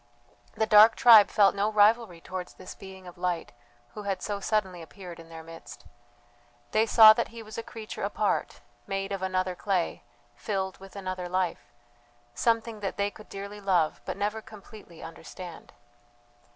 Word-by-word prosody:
The 220 - +1
dark 215 +1 +7
tribe 225 -4 +8
felt 200 -2 +4
no 205 +2 0
rivalry 210 -4 +3
towards 185 0 -7
this 185 - -10
being 190 -1 -12
of 175 -1 -12
light 180 -2 -2 0.4
who 210 - -7
had 200 -2 -3
so 205 -1 -3
suddenly 190 -4 -1
appeared 175 +1 -11
in 165 0 -13
their 165 -1 -10
midst. 165 0 -12 0.9
They 220 +1 +2
saw 220 -1 +9
that 235 - -1
he 230 0 -10
was 215 0 -11
a - - -3
creature 225 -1 -9
apart, - - -1 0.3
made 195 0 -3
of 195 -1 -3
another 185 0 -1
clay, 185 -1 -2 0.3
filled 190 -3 -3
with 195 0 -14
another 185 -2 -5
life; 185 -1 -2 0.6
something 230 - 0
that 200 0 -4
they 200 0 0
could 215 - -15
dearly 200 +1 -8
love, 180 -5 +1
but - - -5
never 210 +2 -2
completely 210 -5 -14
understand. 170 +1 -10
195 Hz, 165 wpm, -27 LUFS, 185-215 Hz, 0.9 s, saw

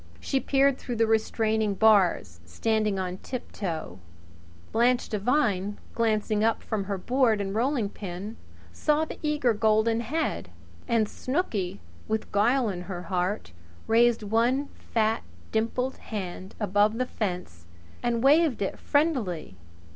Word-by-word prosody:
She 270 - 0
peered 275 +1 +2
through 245 - -4
the 225 0 +3
restraining 220 -1 +1
bars, 185 - +3
standing 210 - 0
on 185 -1 -3
tiptoe. 170 - -5 0.7
Blanche 240 +2 +2
Devine, 210 -3 0 0.2
glancing 215 -2 +1
up 225 0 +1
from 210 -3 -2
her 200 0 -2
board 240 +1 +2
and 195 -1 -2
rolling 240 0 +1
pin, 200 +2 -7 0.4
saw 305 +1 +1
the - - -9
eager 295 -6 +1
golden 220 +1 +2
head. 290 +8 -2 0.4
And 230 -3 +2
Snooky, 210 - -2 0.3
with 220 0 -2
guile 235 +5 +3
in 185 -4 -3
her 175 -2 -4
heart, 180 - -1 0.3
raised 235 0 +4
one 240 +7 +1 0.2
fat, 220 0 +2 0.3
dimpled 240 +4 -1
hand 190 -3 -6
above 210 +1 +2
the 255 - +1
fence 180 - -4 0.3
and 235 -1 0
waved 285 -5 +4
it 195 - -3
friendlily. 245 - 0
220 Hz, 130 wpm, -27 LUFS, 200-245 Hz, 0.7 s, raised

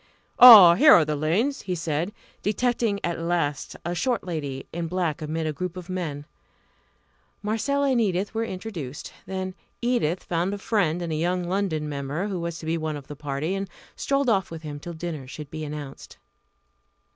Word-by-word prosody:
"Ah, 215 -9 +12
here 290 - +7
are 160 - +6
the 150 0 -1
Lanes!" 190 - 0
he 185 -2 -3
said, 165 +2 -2 0.3
detecting 225 0 0
at 170 -1 -2
last 165 -4 -1
a 175 - -1
short 245 +5 -1
lady 145 -7 -4
in 170 0 -3
black 170 -3 -2
amid 160 +1 -3
a 155 - -1
group 180 +4 -5
of 180 0 -8
men. 155 -6 -4 1.2
Marcella 275 +7 0
and 245 -2 +2
Edith 195 -1 -1
were 225 0 -1
introduced. 185 - -6
Then 190 -1 -4 0.3
Edith 235 -9 0
found 175 +4 -1
a - - -6
friend 180 -5 0
in 170 - -4
a - - -1
young 175 +3 0
London 175 -4 -1
member 145 +7 -3
who 190 -3 -3
was 170 -1 -4
to 160 - -9
be 165 +1 -1
one 155 -1 -3
of 140 - -10
the 150 - -9
party, 145 +4 -3
and 195 -1 -3 0.3
strolled 275 -1 0
off 195 -6 +2
with 165 -1 -8
him 145 -1 -6
till 170 +3 -7
dinner 160 -5 -6
should 145 +2 -9
be 155 0 -5
announced. 145 -2 -8
175 Hz, 185 wpm, -25 LUFS, 155-200 Hz, 1.2 s, Ah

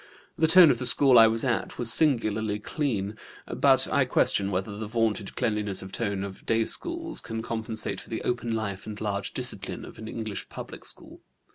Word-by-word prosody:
The 160 - +2
tone 170 -1 +8
of 120 - -1
the 125 - +1
school 130 -1 +5
I 115 - +8
was 115 +1 -1
at 120 -4 -1
was 115 -2 +1
singularly 110 -8 +1
clean, 105 -4 -3 0.3
but - - +5
I - - +4
question 100 -1 +2
whether 95 +2 -3
the 105 +1 -5
vaunted 110 -3 -1
cleanliness 105 -3 -1
of 95 - -9
tone 100 -4 -2
of 100 -1 -8
day 115 0 +1
schools 335 - -2
can 110 0 -5
compensate 110 -3 -3
for - - -15
the 110 - -4
open 120 -2 -1
life 100 -2 -4
and 105 -1 -7
large 100 -2 -3
discipline - - -4
of - - -13
an 110 - -8
English 110 -3 -6
public - - -9
school. - - -7
110 Hz, 190 wpm, -27 LUFS, 105-120 Hz, 0.3 s, tone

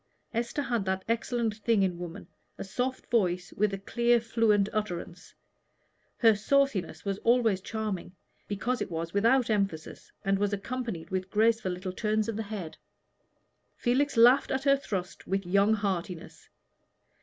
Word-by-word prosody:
Esther 235 +5 -1
had 240 -5 -1
that 190 0 -2
excellent 230 -1 0
thing 215 -2 +2
in 180 -2 -1
woman, 175 +2 -7 0.3
a - - -5
soft 250 +7 -3
voice 180 -6 +1
with 195 -1 -1
clear 240 0 +3
fluent 225 -3 +2
utterance. 180 -4 -4 0.8
Her 225 -2 +6
sauciness 210 - 0
was 200 0 -2
always 230 -5 +3
charming 205 -4 -4 0.3
because 240 +5 -2
it - - -2
was 165 0 -4
without 230 +4 +3
emphasis, 195 -7 -2
and 195 0 +2
was 205 0 0
accompanied 215 -4 -4
with 185 0 -2
graceful 220 -2 +2
little 180 +1 -5
turns 215 +2 0
of 225 - -2
the 220 - -2
head. 200 -6 -6 1.0
Felix 265 +2 +1
laughed 245 +4 +6
at 265 0 -1
her 275 0 +5
thrust 190 -9 -5
with 195 0 -1
young 200 +4 +3
heartiness. 185 -5 -4
210 Hz, 145 wpm, -29 LUFS, 190-235 Hz, 1.0 s, Her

